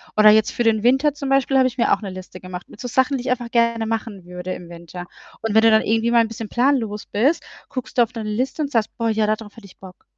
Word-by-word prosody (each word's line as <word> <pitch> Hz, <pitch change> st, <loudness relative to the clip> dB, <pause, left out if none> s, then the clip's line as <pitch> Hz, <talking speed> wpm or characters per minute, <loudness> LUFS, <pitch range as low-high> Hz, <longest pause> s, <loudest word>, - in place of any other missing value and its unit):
Oder 215 Hz, 0 st, +7 dB
jetzt 215 Hz, 0 st, +4 dB
für 240 Hz, -, -1 dB
den 220 Hz, -2 st, +2 dB
Winter, 270 Hz, +4 st, +3 dB
zum 280 Hz, -2 st, -4 dB
Beispiel, 270 Hz, 0 st, +2 dB
habe 260 Hz, -1 st, +5 dB
ich 255 Hz, -, -6 dB
mir -, -, +2 dB
auch -, -, -1 dB
'ne 200 Hz, -, -5 dB
Liste 185 Hz, 0 st, -10 dB
gemacht, 180 Hz, -1 st, -9 dB
mit -, -, -15 dB
so 245 Hz, -, -5 dB
Sachen, 260 Hz, +3 st, +1 dB
die -, -, -5 dB
ich 255 Hz, -, -1 dB
einfach 240 Hz, -2 st, -2 dB
gerne 235 Hz, -1 st, +2 dB
machen 220 Hz, -4 st, -4 dB
würde 180 Hz, +1 st, -6 dB
im 175 Hz, -, -10 dB
Winter. 170 Hz, +1 st, -9 dB, 0.3 s
Und 225 Hz, -2 st, -2 dB
wenn 220 Hz, -, +7 dB
du 225 Hz, -, +6 dB
dann 220 Hz, -, +5 dB
irgendwie 225 Hz, +2 st, +1 dB
mal 235 Hz, -1 st, +5 dB
'n -, -, -2 dB
bisschen 225 Hz, -1 st, -7 dB
planlos 240 Hz, -5 st, 0 dB
bist, 265 Hz, +11 st, +1 dB, 0.3 s
guckst 255 Hz, -1 st, -6 dB
du 240 Hz, -, +7 dB
auf 235 Hz, -, -5 dB
deine 220 Hz, -3 st, -5 dB
Liste 255 Hz, +8 st, -2 dB
und 290 Hz, -2 st, -2 dB
sagst: 225 Hz, -4 st, 0 dB
„Boah, 230 Hz, -1 st, 0 dB
ja, 220 Hz, -1 st, +1 dB
da 215 Hz, -, +2 dB
drauf 215 Hz, -2 st, -13 dB
hätte 225 Hz, -, -13 dB
ich -, -, -19 dB
Bock.“ 185 Hz, -1 st, -14 dB
225 Hz, 290 wpm, -21 LUFS, 210-250 Hz, 0.3 s, Oder